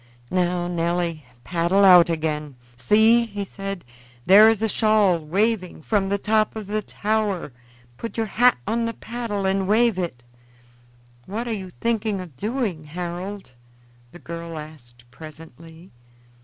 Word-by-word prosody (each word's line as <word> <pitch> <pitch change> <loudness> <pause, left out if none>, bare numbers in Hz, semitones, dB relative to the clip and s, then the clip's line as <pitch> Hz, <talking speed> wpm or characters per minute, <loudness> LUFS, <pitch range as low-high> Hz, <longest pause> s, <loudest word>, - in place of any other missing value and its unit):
Now, 180 -1 0
Nelly, 170 -3 -2 0.2
paddle 180 +3 +2
out 180 -3 +8
again. 155 -3 -2 0.2
See!" 220 - +4
he 205 -2 -5
said, 195 -3 -7 0.4
"there 205 +4 +8
is 225 -1 0
a - - +3
shawl 215 -4 +3
waving 185 +2 -1
from 200 0 0
the 200 - +1
top 215 +2 +1
of 215 -2 -6
the 210 +2 -2
tower. 210 -6 -2 0.5
Put 230 - -7
your 225 - 0
hat 245 +4 +3
on 230 +1 0
the 230 - -3
paddle 225 -4 -4
and 190 0 0
wave 220 -1 +3
it." 160 -10 -4 1.0
"What 225 +5 -4
are 230 - -2
you 190 -3 -6
thinking 220 -3 0
of 175 -7 -9
doing, 210 - -3
Harold?" 180 +2 -6 0.6
the - - -12
girl 170 -1 -7
asked 140 -6 -12
presently. 160 +3 -13
190 Hz, 140 wpm, -23 LUFS, 165-215 Hz, 1.0 s, out